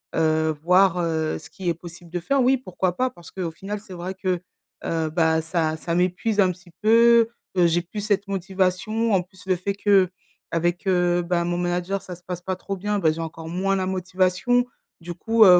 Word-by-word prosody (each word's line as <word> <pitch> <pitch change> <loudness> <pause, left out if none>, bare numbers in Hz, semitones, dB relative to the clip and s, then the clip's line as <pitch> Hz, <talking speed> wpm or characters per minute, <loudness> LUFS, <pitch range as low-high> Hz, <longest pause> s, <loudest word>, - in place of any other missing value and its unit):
Heu, 160 -1 +2
voir, 180 +1 +5
heu, 160 -2 0
ce - - -14
qui 185 -3 -4
est - - +2
possible 170 +1 -12
de 175 - -2
faire, 275 +10 +1
oui 260 +2 +4
pourquoi 185 -6 -2
pas? 255 0 +2
Parce 175 -7 -15
qu'au 180 -3 -3
final, 195 +5 -5
c'est 200 -2 -12
vrai 180 +1 -5
que, 185 -2 -1 0.4
heu, 160 -1 0
bah, 160 0 +2
ça 160 -1 0
ça 170 +1 -3
m'épuise 185 +5 0
un 190 -2 +5
petit 175 0 -14
peu, 230 +1 +6 0.3
heu, 175 -1 +6
j'ai 170 +1 +2
plus 180 +5 -7
cette 205 -1 0
motivation, 195 +4 0
en 190 - +4
plus, 185 +1 -16
le 190 -1 +2
fait 195 +3 -3
qu'avec, 185 -2 0
heu, 175 -1 +3
bah, 170 0 0
mon 175 0 -1
manager 180 +2 -1
ça 180 - -8
se 180 - -21
passe 180 -1 -5
pas 185 +1 -2
trop 195 +2 -5
bien, 205 +2 -1
bah, 165 -5 +3
j'ai 160 +1 -4
encore 160 0 -6
moins 190 +3 0
la 190 -1 0
motivation 185 +6 +1 0.3
du 175 0 -6
coup, 225 +5 +4
heu, 180 -2 +9
180 Hz, 210 wpm, -24 LUFS, 170-195 Hz, 0.4 s, heu